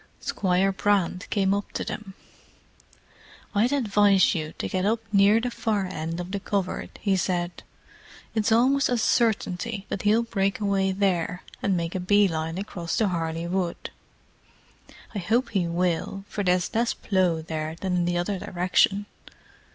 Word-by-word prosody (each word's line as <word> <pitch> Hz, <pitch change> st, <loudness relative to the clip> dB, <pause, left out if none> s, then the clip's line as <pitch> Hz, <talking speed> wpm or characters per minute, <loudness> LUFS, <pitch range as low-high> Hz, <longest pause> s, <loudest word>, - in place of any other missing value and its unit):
Squire 190 Hz, 0 st, +1 dB
Brand 195 Hz, -1 st, 0 dB
came 195 Hz, -2 st, +2 dB
up 200 Hz, 0 st, -3 dB
to -, -, -2 dB
them. 195 Hz, -3 st, -6 dB, 1.4 s
"I'd 225 Hz, +5 st, +2 dB
advise 205 Hz, -8 st, +4 dB
you 155 Hz, -4 st, -3 dB
to -, -, -3 dB
get 185 Hz, -1 st, -1 dB
up 220 Hz, +3 st, +2 dB
near 200 Hz, +2 st, +6 dB
the 245 Hz, +1 st, -2 dB
far 210 Hz, -4 st, -1 dB
end 165 Hz, -2 st, -4 dB
of 180 Hz, +1 st, -5 dB
the 200 Hz, -, -2 dB
covert," 195 Hz, -2 st, -3 dB
he 195 Hz, -2 st, +2 dB
said. 175 Hz, -1 st, -1 dB, 0.7 s
"It's 220 Hz, -1 st, +1 dB
almost 265 Hz, +5 st, +4 dB
a 245 Hz, -, +1 dB
certainty 220 Hz, -2 st, 0 dB
that -, -, -3 dB
he'll 215 Hz, +3 st, +3 dB
break 200 Hz, -4 st, -1 dB
away 195 Hz, -2 st, +1 dB
there 180 Hz, -2 st, 0 dB, 0.2 s
and 190 Hz, -2 st, +1 dB
make 170 Hz, 0 st, -2 dB
a 185 Hz, -, -2 dB
bee 205 Hz, +3 st, +4 dB
line 165 Hz, 0 st, -3 dB
across 175 Hz, -4 st, -4 dB
to 215 Hz, -3 st, +2 dB
Harley 165 Hz, -1 st, -2 dB
Wood. 175 Hz, 0 st, -2 dB, 1.2 s
I 205 Hz, -, -2 dB
hope 230 Hz, +8 st, +1 dB
he 185 Hz, -4 st, +1 dB
will, 180 Hz, +3 st, -1 dB
for 205 Hz, -, -3 dB
there's 180 Hz, -1 st, +1 dB
less 235 Hz, +1 st, +1 dB
plough 180 Hz, -5 st, +1 dB
there 155 Hz, 0 st, -4 dB
than 185 Hz, -2 st, -1 dB
in 175 Hz, -1 st, +1 dB
the 175 Hz, 0 st, 0 dB
other 185 Hz, +2 st, -1 dB
direction." 185 Hz, +3 st, +1 dB
195 Hz, 160 wpm, -25 LUFS, 175-205 Hz, 1.4 s, near